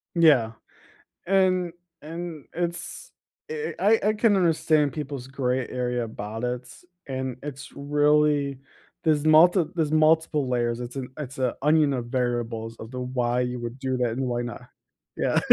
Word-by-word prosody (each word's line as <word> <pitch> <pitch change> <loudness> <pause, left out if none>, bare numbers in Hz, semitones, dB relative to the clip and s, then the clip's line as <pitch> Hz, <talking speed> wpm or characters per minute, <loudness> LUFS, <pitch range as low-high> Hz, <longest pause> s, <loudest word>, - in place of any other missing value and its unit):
Yeah, 145 -10 +5 0.7
and 185 -2 +2 0.3
and 165 -1 -6
it's 175 0 -4 0.4
I 455 -1 -3
I 210 +4 +4
I - - +4
can 210 -1 +3
understand 155 -5 +2
people's 140 -4 -5
gray 130 -2 -1
area 125 -1 -1
about 110 +1 -6
it, 125 0 -3 0.4
and 130 -2 -3
it's 140 -2 -7
really 145 -1 +2 0.5
there's 155 -2 +2
multi 165 +3 +6
there's 160 -3 0
multiple 155 -2 +3
layers, 120 -1 0
it's 125 +2 -7
an 130 -2 -4
it's 135 -3 -7
an 130 -2 +1
onion 150 0 +4
of 125 -3 -2
variables 120 -2 -2
of 110 - -9
the 125 0 -5
why 125 -1 0
you 125 0 -2
would 120 +2 -6
do 130 -1 -1
that 125 -2 +1
and 130 +3 -2
why 120 -1 -1
not 120 0 -6 0.5
yeah. - - +1
135 Hz, 155 wpm, -25 LUFS, 125-155 Hz, 0.7 s, multi